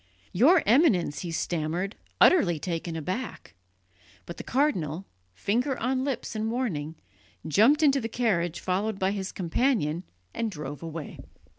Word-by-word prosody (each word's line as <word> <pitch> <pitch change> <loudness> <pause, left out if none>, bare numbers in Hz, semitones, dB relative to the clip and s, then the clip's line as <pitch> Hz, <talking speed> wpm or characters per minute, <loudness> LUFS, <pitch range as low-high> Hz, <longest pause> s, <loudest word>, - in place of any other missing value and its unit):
"Your 300 - +5
Eminence!" 215 - +3
he 175 - -5
stammered, 170 +4 -2 0.2
utterly 180 - +5
taken 165 +1 -4
aback; 185 - -5 0.7
but 170 - -8
the - - -6
cardinal, 190 - 0 0.3
finger 245 - 0
on 260 +2 0
lips 270 -4 -3
in 220 +1 -1
warning, 175 - -2 0.5
jumped 235 - +4
into 275 -2 +4
the 225 - -3
carriage 185 -8 0
followed 195 +3 -1
by 190 0 +1
his 195 -1 -3
companion, 180 - 0 0.3
and 230 - -1
drove 150 -6 -7
away. 165 -2 -7
195 Hz, 135 wpm, -27 LUFS, 165-250 Hz, 0.7 s, Your